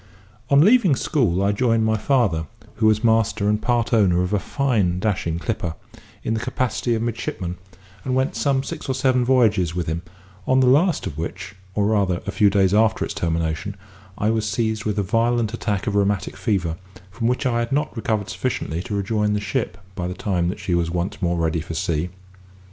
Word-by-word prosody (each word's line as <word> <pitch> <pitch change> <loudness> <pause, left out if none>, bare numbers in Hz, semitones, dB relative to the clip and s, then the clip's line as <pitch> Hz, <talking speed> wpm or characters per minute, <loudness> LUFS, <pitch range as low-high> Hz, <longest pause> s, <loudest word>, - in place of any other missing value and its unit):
On 140 0 +6
leaving 205 - +5
school 105 - +1
I 100 - +3
joined 115 +1 +2
my 110 0 +2
father 105 - +1 0.3
(who 110 - +3
was 110 +1 +3
master 110 -2 +2
and 105 +1 +1
part 120 0 0
owner 90 -5 +4
of 90 - -2
a 105 - +2
fine 105 -7 0
dashing 90 -5 -1
clipper), 90 -3 -3 0.5
in 110 - -1
the 110 - 0
capacity 120 0 -1
of 110 - -2
midshipman, 95 -6 -3 0.5
and 130 - -1
went 130 +1 0
some 135 -2 +1
six 155 0 -6
or 130 - 0
seven 130 -1 +2
voyages 105 -9 +2
with 90 -2 -1
him: 80 +1 -2 0.5
on 130 0 +4
the 130 - +4
last 150 +7 +3
of 70 - -5
which, 90 +4 -5 0.2
or 105 - +2
rather, 100 -4 +1
a 100 - -2
few 105 0 +4
days 95 -1 +2
after 110 +1 +3
its - - -5
termination, 80 +3 -2 0.4
I 105 +2 +1
was 110 -1 0
seized 110 0 -1
with 105 -1 -1
a 100 - +1
violent 115 +2 +1
attack 105 -4 -2
of 105 - -1
rheumatic 100 -1 0
fever, 90 -7 -1 0.3
from 115 +4 -2
which 125 +3 0
I 120 -2 +1
had 115 0 -2
not 150 +1 0
recovered 110 -3 -2
sufficiently 85 -9 -2
to 105 +2 -4
rejoin 105 +1 0
the 105 - 0
ship 95 -2 -2 0.2
by 90 -1 -3
the 90 - -4
time 95 -8 0
that 95 - -5
she 90 - -2
was 85 -1 +1
once 90 +5 -3
more 85 -1 +1
ready 80 -1 0
for 80 +1 -6
sea. 85 -1 -1
105 Hz, 205 wpm, -22 LUFS, 90-120 Hz, 0.5 s, On